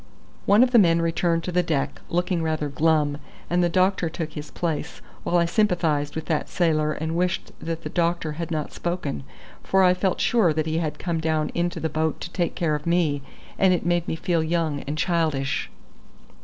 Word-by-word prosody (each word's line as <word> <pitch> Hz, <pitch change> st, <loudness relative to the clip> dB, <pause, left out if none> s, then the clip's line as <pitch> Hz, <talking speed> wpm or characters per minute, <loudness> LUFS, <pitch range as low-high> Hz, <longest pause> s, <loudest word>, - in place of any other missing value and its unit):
One 205 Hz, +4 st, +6 dB
of 255 Hz, -, +2 dB
the 240 Hz, -, +7 dB
men 170 Hz, -4 st, +4 dB
returned 165 Hz, 0 st, +1 dB
to 180 Hz, -, -3 dB
the 180 Hz, 0 st, +3 dB
deck, 155 Hz, -5 st, -2 dB
looking 175 Hz, 0 st, 0 dB
rather 155 Hz, -2 st, -1 dB
glum, 150 Hz, -1 st, +1 dB, 0.3 s
and 175 Hz, 0 st, +3 dB
the 175 Hz, -, +2 dB
doctor 185 Hz, -1 st, +2 dB
took 160 Hz, -1 st, -5 dB
his 150 Hz, 0 st, -7 dB
place, 165 Hz, -4 st, -3 dB, 0.2 s
while 175 Hz, -, +1 dB
I 170 Hz, -, +3 dB
sympathised 170 Hz, -6 st, +1 dB
with 160 Hz, 0 st, -4 dB
that 155 Hz, -2 st, -1 dB
sailor 155 Hz, -3 st, +1 dB
and 160 Hz, +1 st, -3 dB
wished 180 Hz, +1 st, -1 dB
that 165 Hz, 0 st, -4 dB
the -, -, -4 dB
doctor 170 Hz, -2 st, 0 dB
had 165 Hz, +2 st, -5 dB
not 155 Hz, -3 st, -3 dB
spoken, 170 Hz, -, -3 dB, 0.4 s
for 190 Hz, 0 st, +3 dB
I 180 Hz, -1 st, +6 dB
felt 185 Hz, 0 st, 0 dB
sure 215 Hz, -9 st, +3 dB
that 155 Hz, 0 st, -1 dB
he 160 Hz, 0 st, 0 dB
had 155 Hz, -3 st, -2 dB
come 170 Hz, -2 st, -2 dB
down 155 Hz, -1 st, 0 dB
into 175 Hz, 0 st, -1 dB
the 160 Hz, -, -1 dB
boat 160 Hz, -1 st, -1 dB
to -, -, -6 dB
take 175 Hz, -2 st, -1 dB
care 165 Hz, -4 st, 0 dB
of 150 Hz, +2 st, -3 dB
me, 165 Hz, -5 st, +2 dB, 0.4 s
and 190 Hz, -1 st, +5 dB
it -, -, -4 dB
made 175 Hz, -1 st, +1 dB
me -, -, -1 dB
feel 165 Hz, 0 st, 0 dB
young 160 Hz, -3 st, 0 dB
and 150 Hz, +2 st, -3 dB
childish. 155 Hz, -6 st, 0 dB
165 Hz, 205 wpm, -24 LUFS, 155-175 Hz, 0.4 s, the